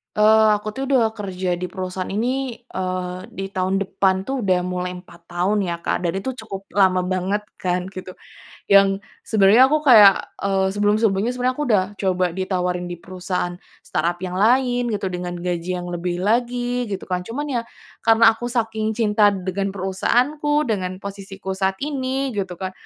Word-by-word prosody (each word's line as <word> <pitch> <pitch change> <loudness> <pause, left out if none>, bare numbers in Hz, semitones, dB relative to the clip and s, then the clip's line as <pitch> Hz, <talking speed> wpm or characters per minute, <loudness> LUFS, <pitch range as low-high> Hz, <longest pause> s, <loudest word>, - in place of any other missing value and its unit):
Eee, 220 +1 +5
aku 210 0 -6
tuh 270 - -3
udah 240 -4 +4
kerja 185 -3 -2
di 180 +1 -5
perusahaan 185 0 -4
ini, 250 +5 -1 0.2
eee, 185 +2 -4
di 195 -4 -5
tahun 190 0 -1
depan 190 0 0
tuh 265 -4 -2
udah 185 -2 +2
mulai 180 0 -3
4 175 -1 -17
tahun 195 +4 +1
ya, 170 -2 -3
Kak, 180 - -2
dan 170 - +1
itu 260 +5 -4
cukup 195 -2 -8
lama 190 -2 +4
banget 185 +2 -1 0.2
kan 180 0 -2
gitu, 185 -1 -8 0.6
yang 195 0 +5 0.2
sebenarnya 220 +4 +6
aku 305 +1 +1
kayak, 210 -8 +7 0.2
eee, 195 -1 +1
sebelum-sebelumnya 205 +2 +1
sebenarnya 250 +1 0
aku 295 - 0
udah 205 -5 +4 0.2
coba 185 -2 +1
ditawarin 180 -1 -2
di 175 - -5
perusahaan 180 0 -4 0.3
startup 175 +1 -1
yang 185 0 -3
lain 245 +2 +3
gitu 195 -2 -3
dengan 180 0 -4
gaji 175 0 -3
yang 175 - -6
lebih 175 +1 -3
lagi 245 +2 0
gitu 195 -2 -4
kan. 180 -1 -2
Cuman 265 +1 -2
ya, - - -3 0.4
karena 225 0 +6
aku 235 +2 -5
saking 220 -2 -1
cinta 210 -2 +3
dengan 195 0 -2
perusahaanku, 280 +11 +1
dengan 190 -6 -3
posisiku 195 -1 -7
saat 190 0 0
ini 270 -2 -2
gitu 190 -4 -3
kan, 185 +1 -5
195 Hz, 170 wpm, -21 LUFS, 185-225 Hz, 0.6 s, kayak